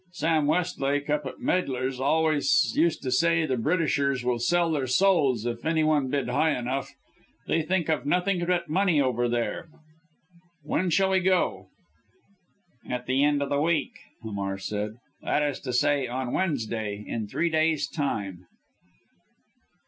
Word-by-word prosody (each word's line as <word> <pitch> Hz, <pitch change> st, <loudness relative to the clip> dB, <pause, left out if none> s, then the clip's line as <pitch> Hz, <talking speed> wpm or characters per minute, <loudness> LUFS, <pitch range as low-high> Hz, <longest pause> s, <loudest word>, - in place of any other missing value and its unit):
Sam 160 Hz, -3 st, +1 dB
Westlake 145 Hz, -4 st, 0 dB
up 150 Hz, -2 st, 0 dB
at 130 Hz, -, -8 dB
Meidler's 130 Hz, -7 st, -1 dB
always 160 Hz, -, +2 dB
used 320 Hz, -, +1 dB
to 130 Hz, -, -2 dB
say 165 Hz, +4 st, +3 dB
the 130 Hz, -4 st, 0 dB
Britishers 140 Hz, -2 st, 0 dB
would 120 Hz, -1 st, 0 dB
sell 170 Hz, +5 st, +2 dB
their 140 Hz, -4 st, -1 dB
souls 135 Hz, -, +2 dB
if 120 Hz, -1 st, -3 dB
any 160 Hz, 0 st, +1 dB
one 150 Hz, -3 st, +2 dB
bid 140 Hz, -1 st, -1 dB
high 145 Hz, +5 st, +1 dB
enough. 125 Hz, +3 st, -3 dB, 0.6 s
They 165 Hz, -, +1 dB
think 175 Hz, +1 st, -1 dB
of 155 Hz, -6 st, 0 dB
nothing 180 Hz, +3 st, +1 dB
but 180 Hz, -1 st, 0 dB
money 180 Hz, -1 st, +2 dB
over 120 Hz, -3 st, +1 dB
there. 120 Hz, +7 st, -2 dB, 0.9 s
When 180 Hz, +5 st, 0 dB
shall 190 Hz, +3 st, +2 dB
we 190 Hz, -, +3 dB
go?" 185 Hz, 0 st, +1 dB, 1.2 s
"At 125 Hz, 0 st, -3 dB
the 130 Hz, +2 st, +1 dB
end 145 Hz, -1 st, +2 dB
of 140 Hz, -, -5 dB
our 140 Hz, 0 st, +1 dB
week," 160 Hz, -1 st, +1 dB, 0.3 s
Hamar 100 Hz, -3 st, -3 dB
said, 105 Hz, +2 st, -4 dB, 0.3 s
"that 150 Hz, -, 0 dB
is 145 Hz, -2 st, -2 dB
to 130 Hz, -, -5 dB
say 140 Hz, +2 st, +2 dB
on 125 Hz, 0 st, -3 dB
Wednesday 110 Hz, -, -2 dB
in 110 Hz, -2 st, -3 dB
three 170 Hz, +10 st, -1 dB
days' 155 Hz, -2 st, +1 dB
time." 100 Hz, -, -4 dB
145 Hz, 155 wpm, -26 LUFS, 125-165 Hz, 1.2 s, say